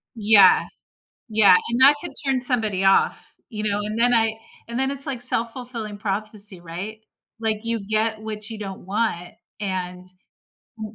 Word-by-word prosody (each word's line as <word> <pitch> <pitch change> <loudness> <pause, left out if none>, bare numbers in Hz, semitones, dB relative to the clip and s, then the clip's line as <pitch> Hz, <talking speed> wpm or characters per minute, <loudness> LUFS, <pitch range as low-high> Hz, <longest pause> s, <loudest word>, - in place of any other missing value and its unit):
Yeah. 205 -3 +6 0.7
Yeah, 210 -4 +6
and 235 +2 -1
that 280 +3 +8
could - - -6
turn 270 -2 0
somebody 225 -7 -1
off, 195 0 +2 0.2
you 215 -3 -5
know, 205 -1 -1
and 210 +1 -4
then 245 +1 +3
I 225 -1 +2 0.3
and 235 +2 -4
then 265 +1 0
it's 280 +1 +5
like 260 -3 -4
self-fulfilling 235 -3 -1
prophecy, 205 -2 -3
right? 180 +6 -7 0.4
Like, 220 -2 -1
you 230 -2 -3
get 215 +1 -1
what 215 -1 -5
you 220 - -7
don't 195 -2 -7
want, 190 -3 -2 0.3
and 185 -3 -4 0.7
w 215 0 -7
215 Hz, 160 wpm, -22 LUFS, 200-230 Hz, 0.7 s, that